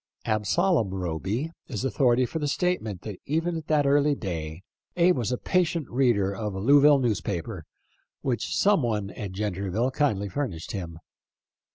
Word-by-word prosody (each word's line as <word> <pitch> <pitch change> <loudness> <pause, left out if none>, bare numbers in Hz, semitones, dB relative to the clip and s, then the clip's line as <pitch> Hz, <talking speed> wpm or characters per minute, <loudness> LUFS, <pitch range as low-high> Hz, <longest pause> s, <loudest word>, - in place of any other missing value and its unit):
Absalom 115 - +1
Roby 95 - -2 0.2
is - - -4
authority 125 0 +3
for 160 - -4
the 150 - -1
statement 140 - -1
that 105 -4 -7
even 165 +4 0
at 160 -2 -6
that 150 -2 +2
early 145 +1 +3
day 85 - -5 0.3
Abe 180 +1 +5
was 120 -3 -1
a 125 - 0
patient 170 -4 0
reader 115 -6 +2
of 105 -1 -4
a - - -3
Louisville 145 +6 +6
newspaper, 100 - -2 0.6
which 120 -5 -1
some 200 -4 +4
one 105 -5 -1
at 100 -3 -6
Gentryville 100 +4 -1
kindly 110 -8 0
furnished 100 - -4
him. 85 -5 -5
120 Hz, 155 wpm, -26 LUFS, 100-145 Hz, 0.6 s, Louisville